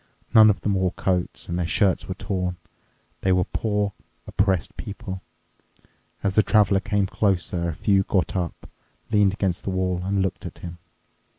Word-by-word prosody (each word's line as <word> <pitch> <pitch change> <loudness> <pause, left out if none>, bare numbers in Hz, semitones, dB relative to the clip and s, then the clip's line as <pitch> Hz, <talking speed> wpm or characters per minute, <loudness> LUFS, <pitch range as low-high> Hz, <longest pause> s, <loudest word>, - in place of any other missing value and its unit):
None 110 -2 +9
of 100 -3 +1
them 105 - 0
wore 95 -1 +1
coats, 90 -2 -2
and 85 +1 -2
their 85 - 0
shirts 95 0 +2
were 95 - -4
torn. 90 -3 -2 0.7
They 95 - +2
were 90 0 +3
poor, 105 0 -1 0.3
oppressed 95 -4 0
people. 95 -2 -6 1.0
As 100 -2 +1
the 110 - +5
Traveler 105 -3 +3
came 100 0 0
closer, 90 -3 0
a 80 - -4
few 100 +2 +3
got 95 -3 0
up, 90 -3 -3 0.4
leaned 105 -3 +4
against 95 -4 -1
the - - -3
wall, 95 -1 -1
and 95 0 0
looked 95 - -3
at - - -8
him. 85 -1 -8
95 Hz, 170 wpm, -24 LUFS, 90-100 Hz, 1.0 s, None